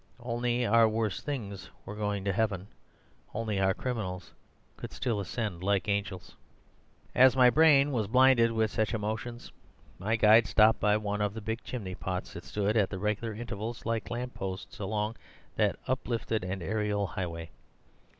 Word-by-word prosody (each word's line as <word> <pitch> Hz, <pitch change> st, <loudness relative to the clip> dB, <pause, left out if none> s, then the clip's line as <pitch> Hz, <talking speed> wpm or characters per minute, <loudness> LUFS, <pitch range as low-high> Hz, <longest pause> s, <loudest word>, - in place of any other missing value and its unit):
Only 120 Hz, 0 st, 0 dB
our 115 Hz, 0 st, +5 dB
worst 110 Hz, -3 st, -2 dB
things 105 Hz, -9 st, -5 dB, 0.2 s
were 105 Hz, -, -7 dB
going 105 Hz, -2 st, -2 dB
to 100 Hz, -, +1 dB
heaven. 100 Hz, -2 st, -1 dB, 0.7 s
Only 110 Hz, -3 st, -1 dB
our 95 Hz, 0 st, +2 dB
criminals 95 Hz, -9 st, -4 dB, 0.4 s
could -, -, -8 dB
still 120 Hz, -5 st, -2 dB
ascend 100 Hz, -2 st, -3 dB
like 100 Hz, 0 st, +1 dB
angels. 100 Hz, -3 st, -3 dB, 0.8 s
"As 130 Hz, 0 st, +6 dB
my 125 Hz, -1 st, +6 dB
brain 145 Hz, -2 st, +5 dB
was 110 Hz, -6 st, 0 dB
blinded 125 Hz, 0 st, +5 dB
with 110 Hz, -1 st, +1 dB
such 110 Hz, +1 st, 0 dB
emotions, 110 Hz, +3 st, -4 dB, 0.5 s
my 110 Hz, +5 st, 0 dB
guide 110 Hz, +1 st, +6 dB
stopped 110 Hz, -1 st, +5 dB
by 105 Hz, 0 st, +3 dB
one 105 Hz, -1 st, -2 dB
of 105 Hz, 0 st, -1 dB
the -, -, -4 dB
big 110 Hz, +3 st, -4 dB
chimney 100 Hz, -7 st, -5 dB
pots 90 Hz, 0 st, -4 dB
that -, -, -9 dB
stood 105 Hz, +1 st, -1 dB
at 100 Hz, -3 st, +3 dB
the 95 Hz, -, -5 dB
regular 105 Hz, +2 st, -2 dB
intervals 115 Hz, 0 st, -6 dB
like 115 Hz, -2 st, -2 dB
lamp 125 Hz, +1 st, -4 dB
posts 95 Hz, 0 st, -6 dB
along 105 Hz, +2 st, -2 dB, 0.4 s
that -, -, +2 dB
uplifted 115 Hz, -4 st, -1 dB
and 95 Hz, 0 st, -4 dB
aerial 105 Hz, +2 st, 0 dB
highway. 85 Hz, -3 st, -5 dB
110 Hz, 160 wpm, -29 LUFS, 100-115 Hz, 0.8 s, As